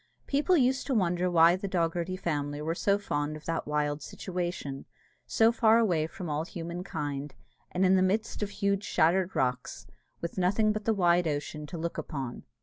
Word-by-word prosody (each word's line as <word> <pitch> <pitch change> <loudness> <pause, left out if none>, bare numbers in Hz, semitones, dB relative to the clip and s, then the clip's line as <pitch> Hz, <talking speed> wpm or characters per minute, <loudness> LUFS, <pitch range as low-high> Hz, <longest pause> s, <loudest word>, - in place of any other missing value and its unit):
People 295 +6 +2
used 260 -1 +2
to 270 - 0
wonder 180 -3 +1
why 170 0 +6
the 195 +2 -4
Dogherty 175 0 -1
family 145 -5 -2
were 155 +2 -1
so 200 +3 +2
fond 145 -6 -2
of 155 - -15
that 165 -2 -2
wild 150 0 -1
situation, 175 -7 -4 0.4
so 225 0 +4
far 225 -1 +4
away 175 -9 +2
from 180 +2 -7
all 150 0 -1
human 170 +1 -6
kind, 145 -5 -4 0.3
and 185 +1 +1
in 185 +1 +5
the 185 - +4
midst 210 +5 0
of 205 - -1
huge 200 0 0
shattered 180 +1 +2
rocks, 125 -1 -1 0.3
with 170 +2 -4
nothing 205 +4 +3
but 210 -1 -4
the 225 - +2
wide 175 -2 +3
ocean 150 0 -3
to 170 - -6
look 165 +1 -3
upon. 135 -6 -5
175 Hz, 185 wpm, -29 LUFS, 155-200 Hz, 0.4 s, why